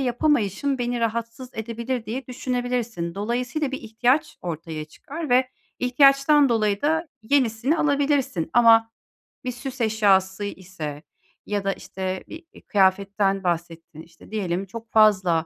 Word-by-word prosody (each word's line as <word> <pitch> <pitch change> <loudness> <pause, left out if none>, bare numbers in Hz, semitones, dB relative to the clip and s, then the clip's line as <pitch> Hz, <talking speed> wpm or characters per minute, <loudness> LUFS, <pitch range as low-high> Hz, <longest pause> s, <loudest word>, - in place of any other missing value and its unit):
yapamayışım 260 - +1
beni 245 0 -1
rahatsız 230 +2 -3
edebilir." 235 +2 -4
diye 240 +4 -4
düşünebilirsin. 245 -8 -3
Dolayısıyla 245 +7 -2
bir 270 - -4
ihtiyaç 240 +6 0
ortaya 160 -2 -5
çıkar 295 - -8
ve 255 +1 +4 0.3
ihtiyaçtan 275 +3 +5
dolayı 215 -4 +1
da 320 +3 +1
yenisini 255 +3 +1
alabilirsin 285 - +1
ama 225 -1 +6 0.5
bir 255 - -2
süs 255 +1 -7
eşyası 205 -3 +2
ise 175 -7 -7 0.4
ya 205 -1 -2
da 195 0 0
işte, 190 -1 -5
bir, 320 +1 -10
eee, - - -15
kıyafetten 195 0 +1
bahsettin, 165 -2 -3
işte, 165 +4 -17
diyelim 190 -3 -2
çok 225 +3 -10
fazla, 185 -7 +4
225 Hz, 130 wpm, -24 LUFS, 190-255 Hz, 0.5 s, ama